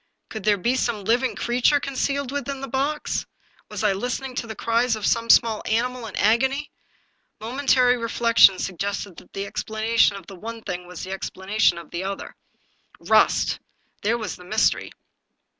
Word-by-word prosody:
Could 220 -3 -7
there 210 -1 +4
be 235 +7 +1
some 235 -5 -1
living 245 +5 +1
creature 250 +5 +2
concealed 275 0 -2
within 280 -1 -3
the 275 - -4
box? 275 +4 -2 0.4
Was - - -5
I 210 -2 +3
listening 250 +6 -3
to 230 - -3
the 220 - -6
cries 230 +2 +1
of 215 - -4
some 230 0 +1
small 225 -3 +5
animal 240 +1 -1
in 205 - -8
agony? 265 +7 +1 0.7
Momentary 250 +2 +2
reflection 230 -4 +5
suggested 195 +1 -4
that - - -15
the 195 0 -3
explanation 220 +1 +1
of 195 -3 -9
the 195 - -11
one 225 +4 -8
thing 180 0 -5
was 180 -1 -8
the 185 - -6
explanation 195 0 0
of 170 - -10
the 175 +1 -3
other. 195 +1 -5 0.6
Rust! - - +3 0.2
— - - -43
^there 225 +3 +2
was 215 -6 -5
the 180 - -13
mystery. 215 +5 +1
230 Hz, 170 wpm, -23 LUFS, 200-250 Hz, 0.7 s, small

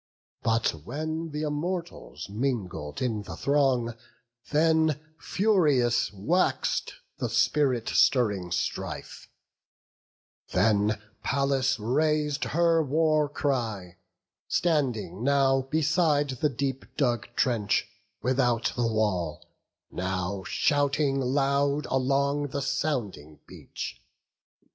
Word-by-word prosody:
But 115 0 +2
when 155 - -4
th' - - -9
Immortals 170 +4 -4
mingled 100 - -3
in 110 -4 -1
the 105 - -8
throng, 135 -5 +1 0.6
Then 160 -1 +3 0.2
furious 150 - +2
wax'd 155 - 0 0.3
the - - -1
spirit 130 -6 +2
stirring 100 -9 +2
strife; 85 - -4 1.2
Then 105 +2 +2 0.2
Pallas 135 -1 +1
rais'd 150 +5 0
her 165 +1 +3
war 155 0 +2
cry, 115 - -2 0.5
standing 125 - 0
now 135 -1 +3
Beside 155 -2 +2
the 130 +4 0
deep 135 0 -3
dug 120 -6 +1
trench, 115 -6 +1 0.4
without 125 -2 +1
the 120 -1 +1
wall, 105 -8 -1 0.5
Now 95 +1 -3
shouting 145 -1 +1
loud 140 +2 +1
along 140 +2 +1
the 140 0 -3
sounding 105 - -2
beach. - - -8
135 Hz, 90 wpm, -27 LUFS, 110-150 Hz, 1.2 s, Then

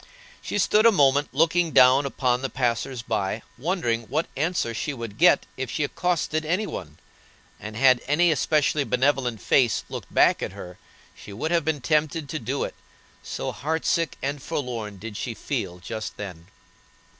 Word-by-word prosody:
She - - -3
stood 210 +3 +4
a - - +7
moment 145 -5 +3
looking 165 +3 +2
down 130 +2 +6
upon 125 -2 0
the 135 - -2
passers 120 0 -1
by 110 -1 -2
wondering 120 -6 -1
what 155 +3 0
answer 155 -5 -1
she 135 +5 -3
would 115 -2 -7
get 175 -3 +5
if 130 -2 -3
she 150 - -1
accosted 155 0 -1
any 180 +7 0
one; 75 - -7 0.6
and 110 0 -8
had 130 -1 +5
any 165 +4 +4
especially 150 0 +2
benevolent 125 -3 +1
face 120 +3 +2
looked - - -7
back - - +4
at - - -4
her 90 0 -10 0.4
she - - -12
would 135 +11 -3
have 170 -2 +2
been 155 -3 -1
tempted 155 +1 0
to 155 - -3
do 130 +3 -2
it, - - -4 0.5
so - - -4
heart 160 +4 -3
sick 165 -3 0
and 140 +1 -2
forlorn 115 -8 -4
did 105 +1 -7
she 115 - -4
feel 100 -12 -4
just 110 +4 -6
then. 90 -5 -8
135 Hz, 170 wpm, -25 LUFS, 115-155 Hz, 0.6 s, a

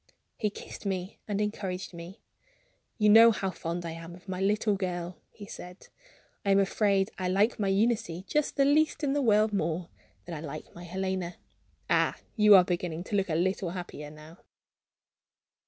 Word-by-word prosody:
He 210 - -1
kissed 200 - -10
me 190 -1 -3
and 205 -1 -1
encouraged 195 -3 -3
me. 170 +4 -10 0.7
"You 210 -2 +3
know 225 +2 +9
how 195 -4 -1
fond 170 0 -4
I 165 - -4
am 165 +1 -9
of 180 +2 -18
my 185 0 -4
little 210 +1 +2
girl," 175 -3 -4
he 205 - -11
said; 180 -1 -11 0.5
"I 200 - -1
am 195 - +5
afraid 195 0 +2
I 185 - -1
like 200 +6 +2
my 200 - 0
Eunice 215 +2 +2 0.2
just 300 +5 0
the 275 - +4
least 305 +2 +2
in 275 -2 +1
the 290 - +1
world 215 -3 +3
more 170 -2 -1 0.4
than 175 - -7
I 155 - -5
like 155 -1 -8
my 175 +1 -10
Helena. 185 -1 -3 0.5
Ah, - - +2 0.2
you 210 -3 +7
are 185 - +8
beginning 175 -2 -3
to 205 - -4
look 195 -2 +1
a 155 - 0
little 185 +1 0
happier 170 -4 -7
now!" 155 +3 -14
190 Hz, 180 wpm, -29 LUFS, 175-210 Hz, 0.7 s, know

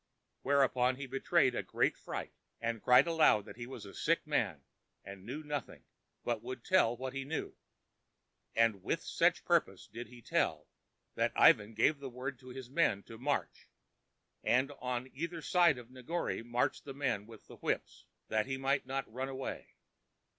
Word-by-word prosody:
Whereupon 130 -2 +3
he 140 +1 -6
betrayed 135 +1 +2
a - - -1
great - - +1
fright, - - -6 0.3
and 115 -1 -2
cried 125 0 +7
aloud 160 -11 +4
that - - -10
he 120 -1 -6
was 130 - -8
a 100 - -10
sick 165 +2 +1
man 100 - 0 0.4
and 100 0 -10
knew 145 +6 -5
nothing, 145 -6 -5 0.4
but 120 -3 -1
would 125 0 -7
tell 120 -11 +4
what 130 +1 -4
he 135 0 -3
knew. 150 +4 -4 1.0
And 115 -4 +3
to - - 0
such - - +1
purpose - - +1
did 120 +1 -8
he 120 -1 -14
tell, - - 0 0.5
that - - 0
Ivan 110 +1 +5
gave 140 +6 +3
the 140 -1 -6
word 125 +1 -5
to 130 - -13
his 130 0 -7
men 130 -8 +2
to 115 -1 -11
march, 140 +3 -2 0.7
and 130 +4 +3
on 125 0 -2
either 170 +4 -4
side 175 -6 +4
of 125 0 -11
Negore 130 +6 -3
marched 120 +1 0
the 135 -2 -8
men 115 -7 -1
with 115 -2 -13
the - - -13
whips, - - -3 0.2
that 110 +2 0
he 135 0 -2
might 135 0 0
not 135 +1 -2
run 130 +4 -4
away. 135 0 -6
130 Hz, 175 wpm, -33 LUFS, 115-140 Hz, 1.0 s, cried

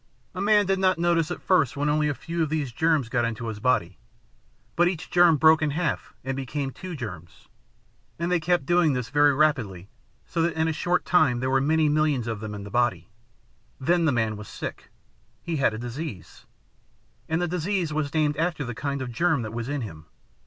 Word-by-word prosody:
A - - -4
man 205 0 +4
did 190 0 +1
not 185 -1 +3
notice 170 -1 +1
at 175 - -6
first 160 -8 +2
when 145 +1 0
only 150 0 +2
a 145 - -2
few 170 +3 -4
of 155 - +1
these 150 -5 -2
germs 155 0 +1
got 120 +1 0
into 115 0 -3
his 110 -2 -6
body. 100 -8 0 0.8
But 175 +1 +4
each 180 -3 -4
germ 175 -3 +5
broke 160 +2 +5
in 155 - +1
half 155 +2 -2
and 135 0 -3
became 135 +1 -3
two 185 +4 -8
germs, 90 - -9 0.7
and 170 +2 -2
they 180 - +3
kept 175 -2 +1
doing 175 -2 +3
this 125 -2 -3
very 145 0 +4
rapidly 125 - 0 0.4
so 165 - -2
that 165 +1 0
in 160 0 +1
a 160 - 0
short 175 +3 0
time 150 -9 +3
there 130 +1 -1
were 135 0 +3
many 155 +2 +2
millions 150 -5 +1
of 115 -3 -3
them 105 -1 -6
in 100 - -7
the 100 - -9
body. 120 -1 0 0.7
Then 170 +5 +2
the 155 - +3
man 110 -4 0
was 105 -1 -9
sick. - - -7 0.5
He 165 -2 -2
had 135 -5 +2
a - - -5
disease, 120 - -7 0.8
and 160 +1 +1
the 175 - 0
disease 180 -1 -1
was 150 -2 -1
named 150 -1 +1
after 165 -3 -1
the 120 - -4
kind 140 +2 -3
of 125 - -5
a - - -7
germ 155 0 +1
that 110 0 -6
was 120 +2 -4
in 145 -1 -2
him. 80 -8 -8
150 Hz, 215 wpm, -25 LUFS, 120-165 Hz, 0.8 s, germ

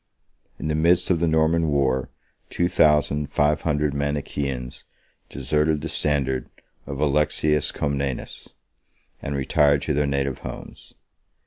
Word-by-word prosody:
In - - -5
the 75 - 0
midst 85 +4 +3
of 85 - +2
the 85 - +1
Norman 80 +1 +2
war, 65 -3 +1 0.4
two 85 - 0
thousand 75 -3 +2
five 75 +1 +2
hundred 75 -2 0
Manichaeans 70 -3 -3 0.5
deserted 75 +2 0
the 80 - -4
standard 70 -4 0 0.4
of 70 -1 -5
Alexius 75 0 +1
Comnenus, 70 -2 -3 0.7
24 - - -8
and 70 - -2
retired 70 +1 +2
to 75 - -1
their 75 0 +1
native 70 -2 -1
homes. - - -10
75 Hz, 130 wpm, -23 LUFS, 70-75 Hz, 0.7 s, midst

